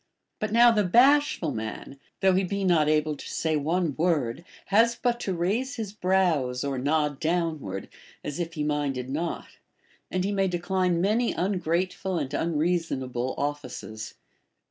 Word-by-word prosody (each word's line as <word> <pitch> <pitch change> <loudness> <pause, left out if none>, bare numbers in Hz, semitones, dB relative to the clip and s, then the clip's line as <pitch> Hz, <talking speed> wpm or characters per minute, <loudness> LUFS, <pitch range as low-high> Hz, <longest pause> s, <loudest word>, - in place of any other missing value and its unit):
But 215 -1 -2
now 235 +1 +7
the 210 -2 +2
bashful 245 - +4
man, 110 +4 -6 0.2
though 190 -1 +5
he 190 +1 +2
be 200 +2 -2
notable 155 -3 +2
to - - -9
say 160 -1 0
one 160 +1 0
word, 155 -5 0 0.3
has 230 +3 +5
but 240 0 0
to 195 -5 -2
raise 220 +11 -1
his 215 -4 -5
brows 175 -11 +1
or 140 -2 -2
nod 150 +1 0
down 165 -1 0
ward, 95 -5 -6 0.4
as 150 +3 -5
if 170 -1 -3
he 150 - -1
minded 140 -4 -1
not, 165 +5 -4 0.5
and 185 0 -1
he 200 - 0
may 195 -1 +1
decline 180 -1 0
many 220 +5 +2
ungrateful 185 0 -1
and 145 -4 -3
unreasonable 150 -7 -1
offices. 125 -6 -5
170 Hz, 150 wpm, -26 LUFS, 145-190 Hz, 0.5 s, now